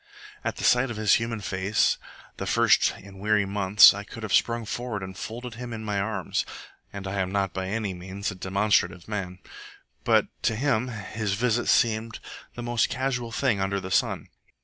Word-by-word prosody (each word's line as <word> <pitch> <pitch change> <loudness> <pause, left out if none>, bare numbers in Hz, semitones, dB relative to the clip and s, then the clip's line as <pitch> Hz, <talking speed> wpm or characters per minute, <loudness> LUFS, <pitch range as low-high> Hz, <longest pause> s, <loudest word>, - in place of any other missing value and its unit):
At - - -2
the - - -7
sight 125 +1 +4
of 110 - -5
his 105 -2 +3
human 115 -2 -3
face, 95 +1 +1 0.4
the - - -4
first - - +4
in 95 -1 -13
weary 105 0 +2
months, 100 0 +7
I 100 +1 -6
could 110 +2 -10
have 110 - -3
sprung 115 -1 +2
forward 115 -3 -4
and 95 0 -7
folded 120 +4 -6
him 120 +1 -7
in 110 -1 -6
my 105 -2 -1
arms 110 +3 -1 0.5
(and 100 -1 -7
I 95 +1 -3
am 95 -1 -1
not 100 -2 0
by 95 0 -3
any 105 -1 -2
means 95 +3 -5
a - - -6
demonstrative 95 -2 0
man); 95 -4 -4 0.7
but - - +4 0.2
to 110 - +1
him 125 -1 +1
his 110 -2 -3
visit 120 +2 0
seemed 115 -1 +2 0.4
the 120 - -6
most 120 -1 +1
casual 125 -2 -2
thing 115 -4 +1
under 100 +1 0
the 95 0 -7
sun. - - 0
105 Hz, 190 wpm, -26 LUFS, 95-115 Hz, 0.7 s, months